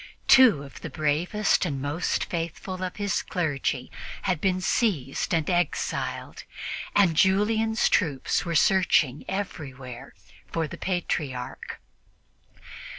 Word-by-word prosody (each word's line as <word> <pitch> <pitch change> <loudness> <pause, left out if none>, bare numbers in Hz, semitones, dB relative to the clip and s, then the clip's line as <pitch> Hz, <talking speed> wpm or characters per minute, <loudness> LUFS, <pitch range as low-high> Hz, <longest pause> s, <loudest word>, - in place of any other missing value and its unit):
Two 240 - +7
of 140 - -12
the 160 - -5
bravest 155 +9 +1
and 145 -7 -2
most 145 +5 -1
faithful 170 +2 -4
of 185 - -4
his 205 -1 -1
clergy 140 -7 -2 0.3
had 180 -5 0
been 185 -1 +1
seized 180 - 0
and 165 -2 +1
exiled, 175 -1 -2 0.5
and 185 -5 +4
Julian's 220 +5 +3
troops 150 -8 +1
were 170 -1 -3
searching 155 -6 +3
everywhere 135 -9 -6 0.3
for 165 -1 -2
the - - -9
Patriarch. 150 -8 -3
170 Hz, 110 wpm, -26 LUFS, 145-190 Hz, 0.5 s, Two